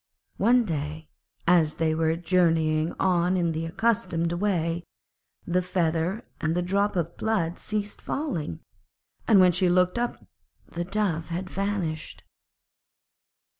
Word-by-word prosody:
One 240 +3 +4
day 155 -2 -4 0.4
as 165 -3 +4
they 160 -1 +1
were 160 0 +1
journeying 165 -2 +2
on 180 0 +2
in 170 -2 +1
the 160 +1 -3
accustomed 175 -4 0
way, 175 -3 0 0.6
the 180 +1 +1
feather 175 +3 -1 0.2
and 160 +1 0
the 180 - +1
drop 200 +3 +1
of 170 -1 -2
blood 185 -6 -1
ceased 210 -1 -4
falling, 175 - -3 0.7
and 210 - +6
when 180 -1 +7
she 180 +1 +2
looked 180 +4 +3
up 240 0 -3 0.4
the 175 +1 -4
Dove 180 -5 -1
had 185 +2 -4
vanished. 190 -6 -3
175 Hz, 130 wpm, -26 LUFS, 165-195 Hz, 0.7 s, when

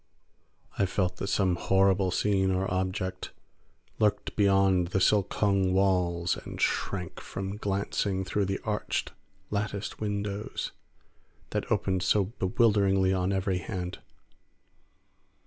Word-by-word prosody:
I 100 - +3
felt 90 -1 -1
that 100 - -3
some 95 -3 +2
horrible 95 0 +3
scene 95 0 +1
or 95 0 +1
object 95 0 -2 0.7
lurked 105 -1 +1
beyond 95 -3 +3
the 95 +2 0
silk 100 +1 +3
hung 100 -3 +2
walls, 90 -3 +2
and - - -8
shrank 90 -3 -1
from 95 +1 -5
glancing 100 -1 -1
through 100 +1 0
the 95 +1 -2
arched, 105 -1 -2 0.4
latticed 100 0 -3
windows 105 0 -3 0.8
that - - -3
opened 95 -1 +1
so 95 +2 +3
bewilderingly 95 -2 +3
on 95 0 0
every 95 -1 0
hand. 90 +1 -5
95 Hz, 115 wpm, -28 LUFS, 95-100 Hz, 0.8 s, I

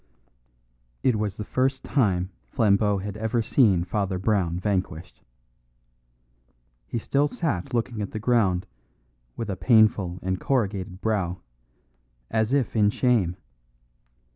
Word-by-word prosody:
It 125 -4 +3
was 105 -2 -2
the 105 - -4
first 130 +3 0
time 95 -8 +1 0.2
Flambeau 100 - +2
had 100 +1 -5
ever 110 +2 0
seen 105 -8 +3
Father 95 0 -2
Brown 90 -3 0
vanquished. 90 -4 -3 1.7
He - - -3
still 140 +5 +1
sat 145 - -3
looking 115 -1 -1
at 100 - -3
the - - -6
ground, 110 -6 +2 0.7
with 115 - -3
a - - -2
painful 105 -6 +3
and 95 0 -1
corrugated 100 -7 -1
brow, 95 -5 -1 0.9
as 110 +1 +1
if 135 -4 +1
in 105 -2 +4
shame. 105 -7 +1
105 Hz, 120 wpm, -25 LUFS, 95-115 Hz, 1.7 s, in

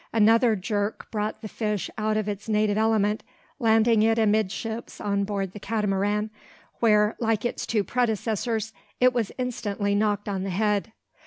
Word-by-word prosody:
Another 225 +1 +4
jerk 205 +1 -3
brought 215 +1 -3
the - - -4
fish 210 -2 -2
out 215 -1 0
of 215 -1 -1
its 205 +1 -5
native 210 -1 +2
element, 215 -1 +2 0.4
landing 225 -1 +4
it 225 +1 +3
amidships 220 +1 -1
on 200 -1 0
board 195 -2 -2
the 210 - -9
Catamaran, 210 0 0 0.5
where, 210 -2 +4
like 225 -2 0
its 240 - -2
two 215 -3 +1
predecessors, 220 -1 -1 0.3
it 255 0 +5
was 235 -4 -1
instantly 210 -5 -2
knocked 205 0 0
on 195 -2 -2
the 195 - -3
head. 210 +3 0
215 Hz, 155 wpm, -25 LUFS, 205-225 Hz, 0.5 s, it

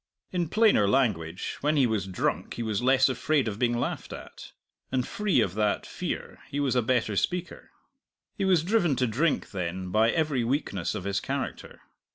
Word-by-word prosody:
In 175 -3 -1
plainer 210 - +4
language, 95 -9 0
when 150 +1 +2
he 135 - +5
was 110 -5 -1
drunk 95 - -2
he 120 - -3
was 110 -1 -1
less 130 +1 +5
afraid 140 +1 +1
of 105 -1 -4
being 120 -1 +2
laughed - - -3
at, - - -10 0.4
and 130 -1 0
free 205 - +1
of 95 -5 0
that 105 0 0
fear - - -5
he 145 0 -3
was 135 -3 +1
a 125 - +4
better 115 -3 0
speaker. 180 - -2 0.7
He 200 - -2
was 185 -4 +3
driven 175 -6 +2
to 130 0 +1
drink, 135 +8 0
then, 90 -1 -4
by 110 +3 +4
every 150 -4 +1
weakness 115 - -1
of 100 - -4
his 100 0 -1
character. - - -5
125 Hz, 185 wpm, -27 LUFS, 105-150 Hz, 0.7 s, he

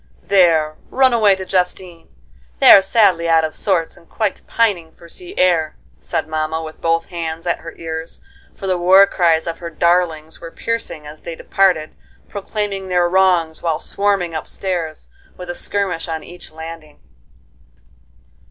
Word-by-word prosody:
"There, 165 -5 +3
run 260 -1 +3
away 210 -4 +4
to 190 0 -7
Justine. 180 -2 -2 0.5
They - - +8
are 195 - +10
sadly 190 -4 +2
out 165 -1 +4
of 155 - -2
sorts, 180 -6 -1
and 170 - -20
quite 210 -4 -2
pining 185 -8 0
for 170 - -16
sea 365 - -11
air," 165 -4 +2 0.2
said 160 -2 -3
mamma, 155 0 -2
with 155 0 -10
both 165 0 +1
hands 165 -1 -5
at 175 - -1
her 165 - -9
ears, 160 0 -5 0.4
for 195 - -8
the 185 -2 0
war 190 +3 +7
cries 170 -5 +1
of 165 -1 -5
her 170 -1 -6
darlings 165 -1 0
were 165 - -8
piercing 225 -6 -4
as 150 +1 -11
they 170 - -7
departed, 180 -4 +1 0.3
proclaiming 200 -1 -4
their 180 -1 +2
wrongs 175 -3 +2
while 165 -2 0
swarming 195 -1 -1
up 160 - -5
stairs, 170 -5 -4 0.3
with 180 -1 -6
a - - -5
skirmish 195 -5 -2
on 160 -2 -4
each 175 -2 -11
landing. 160 -1 -10
170 Hz, 160 wpm, -18 LUFS, 160-190 Hz, 0.5 s, are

